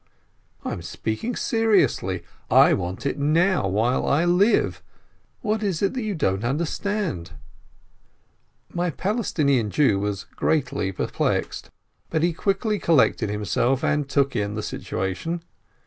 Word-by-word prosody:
"I -, -, -2 dB
am -, -, -6 dB
speaking 110 Hz, -, -3 dB
seriously. 195 Hz, -, +1 dB, 0.3 s
I -, -, +6 dB
want 90 Hz, +6 st, -3 dB
it 140 Hz, -, -1 dB
now, 165 Hz, -, +2 dB
while 110 Hz, +7 st, +1 dB
I 155 Hz, +5 st, +3 dB
live! 180 Hz, +6 st, +3 dB, 0.6 s
What 215 Hz, -2 st, 0 dB
is 195 Hz, -4 st, -1 dB
it 195 Hz, -, +1 dB
you 215 Hz, -6 st, -2 dB
don't 95 Hz, -, 0 dB
understand 155 Hz, -, -2 dB, 0.7 s
?" -, -, -36 dB
My 175 Hz, +1 st, 0 dB
Palestinian 155 Hz, -, 0 dB
Jew 105 Hz, -6 st, +3 dB
was 100 Hz, -1 st, -2 dB
greatly 125 Hz, -10 st, -1 dB
perplexed, 95 Hz, -, -2 dB, 0.4 s
but 160 Hz, -1 st, 0 dB
he 170 Hz, 0 st, +2 dB
quickly 200 Hz, +4 st, 0 dB
collected 135 Hz, -8 st, +3 dB
himself, 120 Hz, +5 st, 0 dB
and 150 Hz, -2 st, 0 dB
took 140 Hz, -2 st, +1 dB
in 105 Hz, -1 st, -1 dB
the 105 Hz, -, -3 dB
situation. 95 Hz, -, -3 dB
145 Hz, 130 wpm, -24 LUFS, -, 0.7 s, I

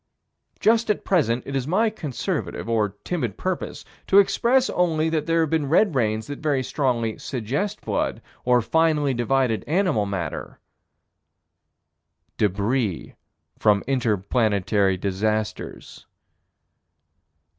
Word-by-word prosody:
Just 225 Hz, +1 st, +3 dB
at 210 Hz, -, 0 dB
present, 125 Hz, -, +1 dB
it 140 Hz, -, -5 dB
is 135 Hz, 0 st, -1 dB
my 215 Hz, +7 st, +2 dB
conservative, 150 Hz, -, -4 dB
or 105 Hz, -3 st, 0 dB
timid 125 Hz, -, -3 dB
purpose, 185 Hz, -1 st, -4 dB, 0.2 s
to 195 Hz, -, +4 dB
express 245 Hz, +6 st, +4 dB
only 160 Hz, -3 st, +1 dB
that 155 Hz, -1 st, -1 dB
there 165 Hz, 0 st, +3 dB
have 160 Hz, -, 0 dB
been 155 Hz, -4 st, 0 dB
red 185 Hz, +4 st, +4 dB
rains 110 Hz, -4 st, 0 dB
that 145 Hz, +3 st, -7 dB
very 145 Hz, -4 st, 0 dB
strongly 120 Hz, -6 st, -1 dB
suggest 140 Hz, -, -3 dB
blood -, -, -1 dB, 0.2 s
or 125 Hz, -1 st, +3 dB
finely 155 Hz, -1 st, +2 dB
divided 120 Hz, -1 st, +1 dB
animal 165 Hz, -, +1 dB
matter 90 Hz, -6 st, -4 dB, 1.8 s
Débris 105 Hz, 0 st, 0 dB, 0.5 s
from 105 Hz, -2 st, +3 dB
inter 120 Hz, -5 st, +1 dB
planetary 100 Hz, -2 st, +1 dB
disasters. 105 Hz, +3 st, -3 dB
130 Hz, 115 wpm, -23 LUFS, 110-160 Hz, 1.8 s, to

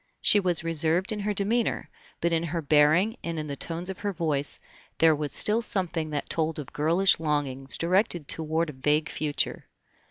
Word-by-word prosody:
She 210 Hz, -, +4 dB
was 180 Hz, -4 st, 0 dB
reserved 165 Hz, +4 st, +2 dB
in 215 Hz, -, -3 dB
her 210 Hz, +1 st, -1 dB
demeanor, 220 Hz, +4 st, +1 dB, 0.3 s
but 170 Hz, 0 st, +1 dB
in 165 Hz, -, +1 dB
her 170 Hz, 0 st, -3 dB
bearing 155 Hz, -, +3 dB
and 170 Hz, -1 st, -4 dB
in 155 Hz, -, -3 dB
the 140 Hz, -2 st, -5 dB
tones 165 Hz, +4 st, -2 dB
of 190 Hz, -1 st, -5 dB
her 205 Hz, -, -2 dB
voice 155 Hz, -6 st, 0 dB, 0.4 s
there 160 Hz, -1 st, +5 dB
was 150 Hz, -1 st, -4 dB
still 215 Hz, +2 st, +2 dB
something 175 Hz, -7 st, -2 dB
that 145 Hz, -2 st, -4 dB
told 160 Hz, -1 st, -2 dB
of 145 Hz, -4 st, -8 dB
girlish 170 Hz, +6 st, +3 dB
longings 140 Hz, -4 st, -1 dB
directed 175 Hz, -3 st, 0 dB
toward 160 Hz, 0 st, -1 dB
a -, -, -15 dB
vague 150 Hz, +4 st, 0 dB
future. 150 Hz, -2 st, -2 dB
165 Hz, 185 wpm, -26 LUFS, 150-185 Hz, 0.4 s, there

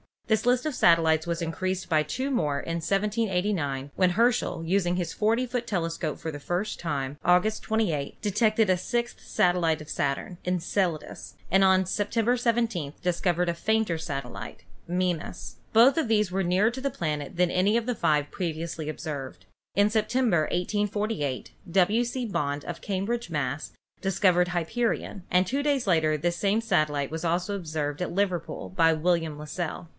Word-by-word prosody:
This 220 Hz, -1 st, +1 dB
list 250 Hz, +2 st, +3 dB
of 305 Hz, -, -1 dB
satellites 165 Hz, -4 st, +4 dB
was 170 Hz, 0 st, -2 dB
increased 185 Hz, +3 st, -2 dB
by 155 Hz, -3 st, +3 dB
two 260 Hz, -, -3 dB
more 150 Hz, -, 0 dB
in 165 Hz, -, -4 dB
1789, 185 Hz, -7 st, -1 dB
when 185 Hz, -1 st, +4 dB
Herschel, 225 Hz, -4 st, +1 dB
using 175 Hz, +1 st, +1 dB
his 175 Hz, -2 st, -2 dB
40 225 Hz, +4 st, +1 dB
foot 245 Hz, -1 st, -3 dB
tele 170 Hz, -6 st, -1 dB
scope 165 Hz, -2 st, -4 dB
for 160 Hz, -, -4 dB
the 145 Hz, -, -7 dB
first 180 Hz, +8 st, -2 dB
time, 140 Hz, -4 st, -3 dB
August 180 Hz, +5 st, +3 dB
28th, 175 Hz, -11 st, 0 dB
detected 215 Hz, 0 st, +2 dB
a 185 Hz, -, +4 dB
sixth 240 Hz, +6 st, -2 dB
satellite 170 Hz, -3 st, +1 dB
of 155 Hz, -, -11 dB
Saturn, 140 Hz, +6 st, -2 dB
Enceladus, 180 Hz, -2 st, -2 dB, 0.2 s
and 195 Hz, +2 st, +5 dB
on 190 Hz, 0 st, +4 dB
September 225 Hz, +6 st, +1 dB
17th 230 Hz, -, 0 dB
dis 180 Hz, -1 st, 0 dB
covered 175 Hz, -1 st, +1 dB
a -, -, +1 dB
fainter 220 Hz, -1 st, 0 dB
satellite, 125 Hz, -11 st, -6 dB, 0.2 s
Mimas. 180 Hz, -2 st, -2 dB, 0.2 s
Both 245 Hz, +6 st, +6 dB
of 320 Hz, -6 st, +1 dB
these 210 Hz, -3 st, +2 dB
were 190 Hz, +1 st, 0 dB
nearer 185 Hz, +6 st, +3 dB
to 260 Hz, +2 st, -7 dB
the 275 Hz, -, 0 dB
planet 150 Hz, -, -3 dB
than 180 Hz, 0 st, +2 dB
any 195 Hz, +4 st, +2 dB
of 235 Hz, -1 st, +1 dB
the 250 Hz, -, 0 dB
five 150 Hz, -8 st, +1 dB
previously 165 Hz, -3 st, -4 dB
ob 155 Hz, -, -6 dB
served. 140 Hz, -5 st, -6 dB, 0.3 s
In 205 Hz, +1 st, +4 dB
September, 215 Hz, -4 st, +2 dB
1848, 205 Hz, -, -1 dB, 0.2 s
W. 195 Hz, +6 st, +3 dB
C. 245 Hz, +1 st, -3 dB
Bond, 145 Hz, -8 st, -2 dB
of 175 Hz, -, -6 dB
Cambridge, 205 Hz, +3 st, -2 dB
Mass., 145 Hz, -2 st, -3 dB, 0.3 s
discovered 185 Hz, -2 st, +3 dB
Hyperion, 180 Hz, +3 st, -2 dB
and 180 Hz, +1 st, +3 dB
two 275 Hz, +9 st, -1 dB
days 285 Hz, -3 st, +1 dB
later 160 Hz, -5 st, +2 dB
this 175 Hz, +3 st, -1 dB
same 205 Hz, +5 st, +1 dB
satellite 150 Hz, -10 st, +1 dB
was 160 Hz, +1 st, -4 dB
also 175 Hz, +4 st, 0 dB
observed 155 Hz, -5 st, -3 dB
at 180 Hz, -, -2 dB
Liverpool 185 Hz, -3 st, -1 dB
by 165 Hz, -3 st, +3 dB
William 165 Hz, -1 st, 0 dB
Las 150 Hz, 0 st, -8 dB
sell. 170 Hz, -1 st, -4 dB
180 Hz, 170 wpm, -27 LUFS, 160-215 Hz, 0.3 s, Both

